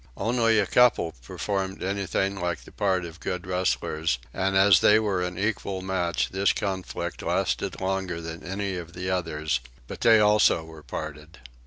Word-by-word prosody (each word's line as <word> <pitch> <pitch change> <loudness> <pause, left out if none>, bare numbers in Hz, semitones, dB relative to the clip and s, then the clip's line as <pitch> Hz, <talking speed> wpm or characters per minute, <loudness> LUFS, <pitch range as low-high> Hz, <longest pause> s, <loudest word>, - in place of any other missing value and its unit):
Only 115 -1 +2
one 105 - +3
couple 120 -8 +3
performed 95 +6 -3
anything 100 0 -1
like 90 -2 -2
the - - -14
part 95 -4 0
of 85 0 -10
good 90 -2 -4
wrestlers; 85 -5 0 0.2
and 95 0 +1
as 95 -2 +7
they 105 - +6
were 105 -4 0
an 90 0 -3
equal 100 -2 -2
match 90 -4 -1
this 95 +1 +2
conflict 95 -2 -4
lasted - - -1
longer 95 -2 -2
than 80 0 -7
any 95 0 -3
of 85 -1 -8
the 90 +1 -3
others; 80 -5 -1 0.3
but - - -8
they 115 -2 +6
also 105 -5 +4
were 80 -1 -12
parted. 75 +4 -7
95 Hz, 165 wpm, -26 LUFS, 85-100 Hz, 0.3 s, as